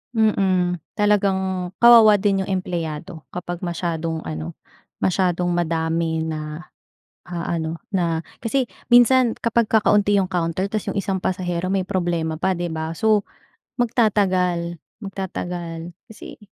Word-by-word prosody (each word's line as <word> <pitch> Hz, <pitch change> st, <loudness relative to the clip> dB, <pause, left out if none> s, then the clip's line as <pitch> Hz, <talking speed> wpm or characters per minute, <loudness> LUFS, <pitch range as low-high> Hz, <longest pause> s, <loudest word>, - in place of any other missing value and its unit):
Mm, 190 Hz, -5 st, +2 dB, 0.2 s
talagang 190 Hz, -3 st, +1 dB
kawawa 225 Hz, -3 st, +8 dB
din 195 Hz, -1 st, +1 dB
yung 195 Hz, -, -5 dB
empleyado 170 Hz, -3 st, -4 dB
kapag 175 Hz, 0 st, -6 dB
masyadong 165 Hz, -2 st, -2 dB
ano, 80 Hz, +1 st, -5 dB, 0.5 s
masyadong 180 Hz, -1 st, +1 dB
madami 165 Hz, -1 st, 0 dB
na 155 Hz, +1 st, -5 dB, 0.6 s
aano 170 Hz, -2 st, -3 dB, 0.2 s
na, 170 Hz, -4 st, 0 dB, 0.2 s
kasi 255 Hz, +4 st, 0 dB, 0.2 s
minsan 245 Hz, 0 st, +5 dB
kapag 230 Hz, -1 st, +1 dB
kakaunti 205 Hz, -2 st, +3 dB
yung 190 Hz, -2 st, +1 dB
counter 175 Hz, +1 st, -1 dB
ta's 215 Hz, -2 st, -3 dB
yung -, -, -2 dB
isang 195 Hz, -1 st, -1 dB
pasahero 180 Hz, -1 st, -2 dB
may 190 Hz, 0 st, 0 dB
problema 170 Hz, -4 st, -2 dB
pa, 190 Hz, +1 st, +1 dB
'di 175 Hz, -1 st, -3 dB
ba? 160 Hz, +1 st, -4 dB
So, 215 Hz, +1 st, +2 dB, 0.5 s
magtatagal, 185 Hz, -7 st, +1 dB, 0.2 s
magtatagal. 175 Hz, -4 st, -5 dB, 0.2 s
Kasi, 220 Hz, -3 st, -11 dB
180 Hz, 120 wpm, -22 LUFS, 165-200 Hz, 0.6 s, kawawa